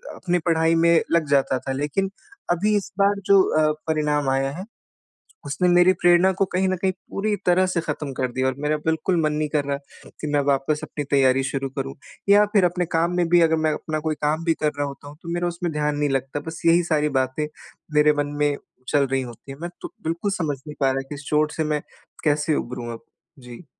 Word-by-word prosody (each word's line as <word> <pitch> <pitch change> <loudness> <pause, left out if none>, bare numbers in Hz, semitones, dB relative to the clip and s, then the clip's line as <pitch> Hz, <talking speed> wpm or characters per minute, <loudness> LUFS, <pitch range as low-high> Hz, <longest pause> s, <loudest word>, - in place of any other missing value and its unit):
अपनी 180 -1 0
पढ़ाई 165 0 +3
में 170 0 +5
लग 165 -3 +2
जाता 135 -2 +2
था। 135 - -5
लेकिन 150 +8 -1 0.4
अभी 205 +5 +2
इस 200 - -4
बार 200 0 +3
जो 200 -1 +6 0.2
अ, 155 -1 +4 0.2
परिणाम 150 -2 +1
आया 135 +1 +1
है, 180 +7 -7 0.8
उसने 180 +5 0
मेरी 175 +1 +5
प्रेरणा 175 +1 +4
को 195 - +4
कहीं 190 +1 +2
न 185 - +1
कहीं 190 +1 +1 0.2
पूरी 210 +1 -1
तरह 180 +1 +4
से 175 -2 0
ख़त्म 150 -4 -4
कर 130 0 -1
दिया 130 +1 0
और 130 - -1
मेरा 150 +1 0
बिल्कुल 160 +2 +1
मन 155 -1 +1
नहीं 150 0 -1
कर 145 -2 0
रहा 140 0 -1 0.4
कि 155 - -3
मैं 145 - +4
वापस 140 +2 +1
अपनी 145 - -4
तैयारी 135 -1 +4
शुरू 135 0 -2
करूँ 135 0 -3 0.3
या 205 +1 +7
फिर 195 -4 +5
अपने 180 +1 0
काम 170 +2 +1
में 175 -1 +2
भी 175 0 +5
अगर 160 -1 +4
मैं 155 - +3
अपना 155 0 -3
कोई 155 - 0
काम 155 +2 0
भी 165 - +3
कर 155 -1 0
रहा 145 0 0
होता 140 +1 -10
हूँ, 150 - -13
तो 170 - -7
मेरा 175 0 0
उसमें 170 -1 -3
ध्यान 150 0 0
नहीं 145 -1 +1
लगता 135 +2 -2
बस 160 0 -6
यही 170 +1 +5
सारी 150 -2 +1
बातें 130 +4 -2 0.5
मेरे 150 0 +5
मन 145 - 0
में 145 -1 +2 0.3
चल 140 -2 +3
रही 135 0 0
होती 120 +2 -10
हैं। 135 - -14
मैं 175 - -3
तो - - -8
बिल्कुल 170 +5 -1
समझ 155 -7 -2
नहीं 150 - -7
पा 135 - +4
रहा 135 +1 -1
कि 145 - -5
इस 140 - -11
चोट 150 0 +2
से 160 - -1
मैं 150 -1 -1 0.4
कैसे 150 0 +2
उबरूँ 120 -1 -4
अब? 115 0 -11 0.3
जी। 125 +6 -12
155 Hz, 230 wpm, -23 LUFS, 140-175 Hz, 0.8 s, या